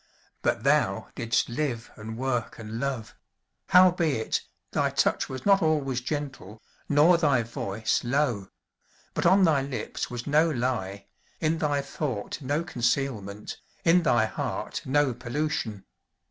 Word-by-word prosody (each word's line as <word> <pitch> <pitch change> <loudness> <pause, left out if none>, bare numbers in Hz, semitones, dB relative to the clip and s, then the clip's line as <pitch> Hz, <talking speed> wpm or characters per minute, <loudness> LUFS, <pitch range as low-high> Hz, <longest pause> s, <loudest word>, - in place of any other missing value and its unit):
But - - 0
thou - - +2
didst 115 +1 0
live 120 -2 -3
and 110 +1 -7
work 125 -2 -2
and 115 0 -6
love; 130 -5 -3 0.5
howbeit, 170 -10 +4 0.3
thy - - +1
touch - - +1
was 130 -1 -6
not 200 -1 +5
always 145 -6 +1
gentle, 130 -7 -5 0.3
nor 155 +4 +5
thy 140 -7 +3
voice 110 -1 -2
low; 120 -6 0 0.7
but - - +1
on 190 +2 +6
thy 155 -6 +4
lips 135 -2 -4
was 120 -1 -5
no 155 +3 +3
lie, 120 -8 -2 0.3
in 160 0 +1
thy 145 -2 +1
thought 140 -4 -4
no 145 +4 -1
concealment, 120 - -2 0.2
in 175 +2 +5
thy 120 -9 +3
heart 110 - -4
no 140 -1 +2
pollution. 125 -4 -3
135 Hz, 130 wpm, -27 LUFS, 115-150 Hz, 0.7 s, on